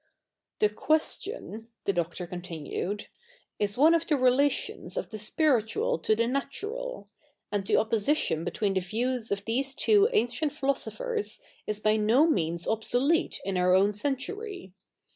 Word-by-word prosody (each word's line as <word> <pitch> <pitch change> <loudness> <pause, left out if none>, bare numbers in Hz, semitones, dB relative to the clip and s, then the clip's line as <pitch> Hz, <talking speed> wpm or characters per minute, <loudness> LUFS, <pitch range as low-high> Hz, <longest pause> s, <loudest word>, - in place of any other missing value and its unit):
' - - -61
The 210 - +5
question,^ 305 - -2 0.2
the 200 - +2
Doctor 175 0 -2
continued, 175 +2 -4
^ - - -8 0.5
is 205 +1 +1
07ie 315 +5 +6
of 330 - -6
the 300 - +2
relations 260 - +1
of - - -3
the 215 - -5
spiritual 300 - +1
to 215 - +2
the 230 - +2
7iatural; 415 - -3 0.5
and 200 -2 -2
the - - +3
oppositio7i 220 - +1
between 200 +3 -1
the 190 - +2
views 230 +5 -2
of 200 0 -2
these 265 +4 -1
tivo 420 0 +4
ancient 280 - 0
philosophers 415 - -2 0.3
is 210 -1 -2
by 215 0 +2
no 225 +8 +4
means 170 - 0
obsolete 245 +8 +1
i7i 190 -2 -1
our 180 0 +4
own 200 +2 +4
century. 285 - -3
230 Hz, 150 wpm, -28 LUFS, 205-305 Hz, 0.5 s, 07ie